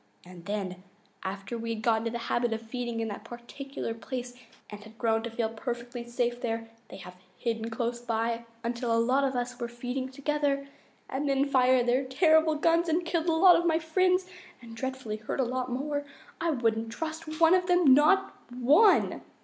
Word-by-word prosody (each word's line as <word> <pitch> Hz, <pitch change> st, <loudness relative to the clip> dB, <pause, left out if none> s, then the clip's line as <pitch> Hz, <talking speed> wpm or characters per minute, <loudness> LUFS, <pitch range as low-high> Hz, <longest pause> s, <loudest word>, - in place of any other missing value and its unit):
And 175 Hz, -1 st, -13 dB
then, 190 Hz, -3 st, -4 dB, 0.4 s
after 195 Hz, +4 st, -5 dB
we 230 Hz, 0 st, -3 dB
had 220 Hz, -, -8 dB
got 225 Hz, 0 st, +2 dB
in -, -, -2 dB
the -, -, -1 dB
habit 235 Hz, 0 st, 0 dB
of 225 Hz, -, -4 dB
feeding 235 Hz, 0 st, -4 dB
in 225 Hz, -, -2 dB
that 205 Hz, -, -7 dB
particular 240 Hz, +1 st, -6 dB
place 245 Hz, +2 st, -6 dB, 0.4 s
and 205 Hz, 0 st, -8 dB
had 220 Hz, +1 st, -15 dB
grown 225 Hz, -1 st, +1 dB
to 235 Hz, -, -4 dB
feel 230 Hz, -1 st, -1 dB
perfectly 240 Hz, +1 st, -5 dB
safe 240 Hz, 0 st, -1 dB
there, 225 Hz, -1 st, -3 dB, 0.2 s
they -, -, -10 dB
have 180 Hz, -1 st, -11 dB, 0.2 s
hidden 225 Hz, -1 st, -2 dB
close 235 Hz, +1 st, -3 dB
by 230 Hz, 0 st, -1 dB, 0.2 s
until 235 Hz, 0 st, -2 dB
a 230 Hz, -, +3 dB
lot 255 Hz, +4 st, +2 dB
of 270 Hz, -1 st, 0 dB
us 245 Hz, 0 st, -3 dB
were 240 Hz, -, -2 dB
feeding 245 Hz, +2 st, -4 dB
together 280 Hz, 0 st, -1 dB, 0.4 s
and 280 Hz, +2 st, -2 dB
then 275 Hz, 0 st, +2 dB
fired 255 Hz, -2 st, +4 dB
their 250 Hz, +2 st, +2 dB
terrible 315 Hz, +3 st, +3 dB
guns 335 Hz, +2 st, +2 dB
and 335 Hz, +2 st, +1 dB
killed 335 Hz, 0 st, -1 dB
a 330 Hz, -, +3 dB
lot 355 Hz, +2 st, +7 dB
of 345 Hz, -, +1 dB
my 320 Hz, -1 st, +3 dB
friends 365 Hz, +3 st, +2 dB, 0.3 s
and 230 Hz, -2 st, -11 dB
dreadfully 260 Hz, -3 st, -4 dB
hurt 215 Hz, +5 st, -5 dB
a -, -, +4 dB
lot 255 Hz, +1 st, -2 dB
more. 285 Hz, +3 st, -2 dB, 0.4 s
I 335 Hz, -, +1 dB
wouldn't 225 Hz, -5 st, 0 dB
trust 315 Hz, +2 st, -5 dB
one 330 Hz, +1 st, +6 dB
of 365 Hz, -1 st, +3 dB
them, 355 Hz, -7 st, +6 dB
not 345 Hz, +8 st, +4 dB, 0.2 s
ONE!" 280 Hz, -, +4 dB
245 Hz, 195 wpm, -28 LUFS, 230-295 Hz, 0.4 s, lot